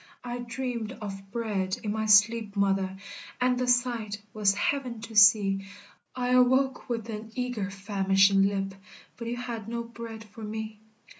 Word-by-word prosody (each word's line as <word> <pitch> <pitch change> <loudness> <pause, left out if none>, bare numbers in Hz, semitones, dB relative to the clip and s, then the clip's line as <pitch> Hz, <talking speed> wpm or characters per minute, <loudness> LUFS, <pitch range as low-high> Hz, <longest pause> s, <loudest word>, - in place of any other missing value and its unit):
I 245 0 -4
dreamed 240 -2 -4
of 195 -2 -8
bread 205 -5 -2
in 210 - -1
my 220 0 -2
sleep, 210 +1 +4
mother, 195 -1 +1 0.4
And 250 0 +2
the 250 - 0
sight 240 -4 +1
was 205 -2 +2
heaven 250 +1 -1
to 225 0 -9
see, 195 -1 +6 0.5
I 250 -1 -1
awoke 255 +2 +3
with 230 -2 -3
an 220 +1 -7
eager, 245 -6 -2
famishing 195 0 +3
lip, 195 -1 -2 0.4
But 235 - -7
you 240 +1 -3
had 235 -3 -5
no 235 0 -3
bread 230 -1 -9
for 215 +1 -14
me. 215 0 -5
220 Hz, 155 wpm, -28 LUFS, 200-240 Hz, 0.5 s, see